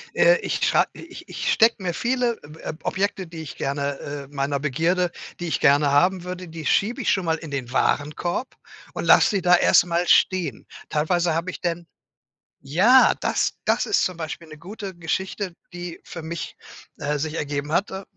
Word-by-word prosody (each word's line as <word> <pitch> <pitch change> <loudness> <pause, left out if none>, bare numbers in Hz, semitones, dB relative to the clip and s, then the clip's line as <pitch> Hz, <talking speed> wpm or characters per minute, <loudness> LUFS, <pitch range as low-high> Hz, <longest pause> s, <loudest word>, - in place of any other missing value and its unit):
äh, - - +5
ich - - -1
schrei - - +4
ich 345 0 -11
ich - - -1
stecke 230 +1 +5
mir 175 -2 -1
viele, 240 +2 0 0.3
ähm 155 - -5
Ob - - -23
Objekte, 195 0 -1
die 165 -1 -8
ich 150 - -8
gerne 140 0 -2
äh, 140 -1 -6
meiner 140 0 -2
Begierde, 165 +6 0 0.3
die 175 - -4
ich 160 - -1
gerne 145 +1 +4
haben 180 +5 +3
würde, 180 0 -6
die 160 -1 -8
schiebe 235 - +1
ich - - 0
schon 190 -2 0
mal 160 -1 +1
in 160 -2 -9
den 130 -3 -4
Warenkorb 150 - -1 0.4
und - - -4
lass - - +6
sie 200 -3 0
da 180 0 +6
erst 175 - +5
mal 175 0 0
stehen. 185 -2 +2 0.2
Teilweise 170 +2 +1
habe 170 +3 -2
ich - - -10
denn 170 -1 -2 0.8
ja, 195 - +5
das - - 0
das - - +2
ist 405 - +2
zum 185 -2 -2
Beispiel 165 0 -6
'ne 155 0 -11
gute 195 +4 -8
Geschichte, 185 +3 -3 0.2
die 175 -1 -7
für 165 - -8
mich, 165 +1 -6 0.4
äh, 150 +1 -1
sich 155 +2 -3
ergeben 145 -1 -3
hat, 190 +5 +1
äh, 190 +1 -6
170 Hz, 190 wpm, -23 LUFS, 150-190 Hz, 0.8 s, lass